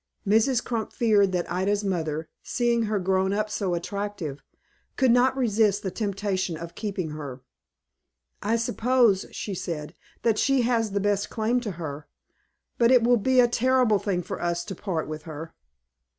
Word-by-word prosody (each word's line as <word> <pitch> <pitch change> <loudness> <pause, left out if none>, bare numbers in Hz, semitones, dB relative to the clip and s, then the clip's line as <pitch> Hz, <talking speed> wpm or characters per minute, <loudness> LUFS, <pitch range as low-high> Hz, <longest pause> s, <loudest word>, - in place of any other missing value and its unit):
Mrs. 225 +4 +3
Crump 230 -3 -2
feared 210 -4 +3
that 175 -1 -2
Ida's 200 +3 0
mother, 160 -5 -2
seeing 235 -2 +1
her 215 - +1
grown 190 0 +1
up 210 +1 -1
so 190 -4 -1
attractive, 195 -5 -4 0.5
could 260 -3 +3
not 255 +2 +4
resist 215 -4 +2
the 190 - -2
temptation 195 -4 -2
of 170 +1 -8
keeping 195 -7 -4
her. 140 -4 -7 1.0
"I 215 +3 +1
suppose," 230 -3 +2
she 205 - -5
said, 160 -4 -5 0.3
"that 225 -2 +2
she 275 -3 +3
has 230 -3 +1
the 200 - +1
best 205 0 0
claim 230 +3 0
to 215 -5 -4
her; 150 -3 -6 0.7
but 235 -1 +5
it 250 -2 +6
will 240 +1 +5
be 255 +4 +2
a 245 - +7
terrible 245 -3 +3
thing 185 -3 -1
for 190 +2 -6
us 175 0 -1
to - - -5
part 170 -3 -3
with 155 0 -5
her." 160 +1 -7
205 Hz, 165 wpm, -26 LUFS, 175-230 Hz, 1.0 s, a